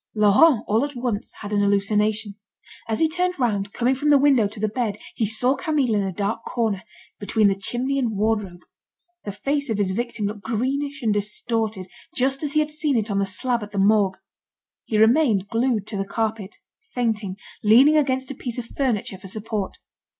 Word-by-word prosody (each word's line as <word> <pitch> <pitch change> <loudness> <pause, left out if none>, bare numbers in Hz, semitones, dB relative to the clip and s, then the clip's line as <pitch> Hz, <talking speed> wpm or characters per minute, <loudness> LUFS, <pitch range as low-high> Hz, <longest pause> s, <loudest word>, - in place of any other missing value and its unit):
Laurent, 215 +5 +5
all 220 +4 +2
at 285 -1 -4
once, 240 -4 -3
had 210 0 -5
an 205 - +2
hallucination. 205 +1 +1 0.5
As 220 -1 -1
he 320 - +4
turned 360 +3 -1
round, 205 -6 0
coming 245 +4 +1
from 290 +3 -1
the 290 - +7
window 270 -6 +4
to 210 +1 -10
the 215 - +1
bed, 215 -2 -2 0.2
he 220 - 0
saw 245 +5 +2
Camille 280 -5 0
in 205 - +2
a 195 -1 -2
dark 205 +5 -2
corner, 220 -6 -1 0.4
between 210 0 +2
the - - +2
chimney 245 +8 -2
and 230 -6 -1
wardrobe. 205 -4 -1 0.6
The 205 - -3
face 280 +8 -2
of 220 - 0
his 200 -2 +2
victim 235 0 -3
looked 205 0 -4
greenish 275 +5 -2
and 220 -2 +2
distorted, 210 -1 -2 0.3
just 270 +2 0
as 295 -2 -3
he 305 - +3
had 305 0 -2
seen 300 -3 0
it 220 -1 -1
on 200 - +1
the 195 - 0
slab 240 +5 0
at 210 0 -8
the - - -4
Morgue. 195 -1 +3 0.7
He 215 - -1
remained 220 -3 +3
glued 230 -3 0
to 205 - -4
the 195 - 0
carpet, 220 -2 -3 0.4
fainting, 220 -6 -1 0.3
leaning 250 +8 +6
against 265 -3 +1
a - - -4
piece 245 -2 -6
of 245 - -4
furniture 230 -7 -2
for 190 - -10
support. 210 0 -4
220 Hz, 195 wpm, -23 LUFS, 205-260 Hz, 0.7 s, the